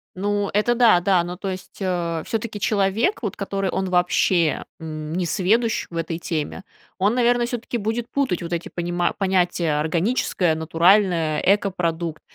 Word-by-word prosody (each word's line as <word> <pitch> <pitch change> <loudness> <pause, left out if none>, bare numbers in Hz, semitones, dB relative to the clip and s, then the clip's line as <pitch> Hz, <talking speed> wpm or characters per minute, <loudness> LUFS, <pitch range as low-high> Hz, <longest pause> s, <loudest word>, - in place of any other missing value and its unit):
Ну, 205 +1 -1
это 210 +4 +2
да 230 -7 +5
да, 180 -1 +2
ну, 175 +1 -6
то 195 0 -4
есть, 185 -1 -8
э, 170 -3 -1
всё-таки 225 -1 -3
человек, 205 - +1
вот 205 - -2
который, 195 -1 -2
он 190 +1 -2
вообще, 180 -3 +2 0.2
м, 155 -1 -6
несведущ 195 +7 +1
в 170 - -7
этой 165 0 -3
теме, 165 +2 -4 0.4
он, 205 +5 +2
наверное, 245 -1 +2
всё-таки 240 0 -4
будет 225 +2 -2
путать 265 -12 0
вот 170 - -5
эти 170 0 -3
понима 175 0 -1
понятия: 180 -5 +1
органическое, 170 +1 +1
натуральное, 165 0 +3
экопродукт. 175 -5 0
185 Hz, 150 wpm, -22 LUFS, 170-210 Hz, 0.4 s, да